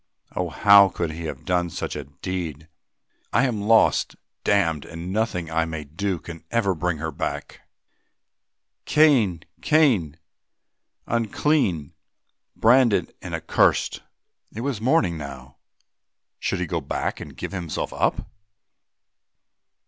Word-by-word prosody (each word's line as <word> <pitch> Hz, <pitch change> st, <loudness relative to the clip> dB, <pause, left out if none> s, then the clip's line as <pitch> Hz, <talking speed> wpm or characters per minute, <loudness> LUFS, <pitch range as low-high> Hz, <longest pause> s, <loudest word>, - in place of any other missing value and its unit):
Oh! 90 Hz, -1 st, -1 dB
how 100 Hz, +4 st, +7 dB
could 85 Hz, -2 st, -3 dB
he 80 Hz, +1 st, -6 dB
have 80 Hz, -, -6 dB
done 90 Hz, -1 st, +1 dB
such -, -, -4 dB
a 75 Hz, -2 st, -5 dB
deed? 80 Hz, +1 st, -5 dB, 0.6 s
"I -, -, +3 dB
am 115 Hz, -5 st, -1 dB
lost, 110 Hz, +2 st, +3 dB, 0.3 s
damned, 80 Hz, -8 st, +2 dB
and 85 Hz, +3 st, -7 dB
nothing 90 Hz, -6 st, -1 dB
I 80 Hz, 0 st, +1 dB
may 80 Hz, -2 st, -5 dB
do 90 Hz, +6 st, -3 dB
can 85 Hz, 0 st, -10 dB
ever 110 Hz, -5 st, +1 dB
bring 85 Hz, 0 st, -1 dB
her 80 Hz, +2 st, -4 dB
back. -, -, -5 dB, 1.2 s
Cain! 125 Hz, -, +4 dB, 0.2 s
Cain! 115 Hz, -, +3 dB, 0.9 s
unclean, 110 Hz, -, 0 dB, 0.6 s
branded 120 Hz, -1 st, +4 dB
and -, -, -4 dB
accurst!" -, -, +1 dB, 0.5 s
It 115 Hz, -, -6 dB
was 130 Hz, -5 st, -2 dB
morning 110 Hz, -, +2 dB
now, 65 Hz, -3 st, -9 dB, 0.8 s
should 95 Hz, -, -1 dB
he 90 Hz, -, -1 dB
go 85 Hz, -1 st, -2 dB
back 70 Hz, -, -3 dB
and -, -, -10 dB
give -, -, -5 dB
himself 90 Hz, -5 st, -4 dB
up? -, -, 0 dB
90 Hz, 125 wpm, -24 LUFS, 80-110 Hz, 1.2 s, how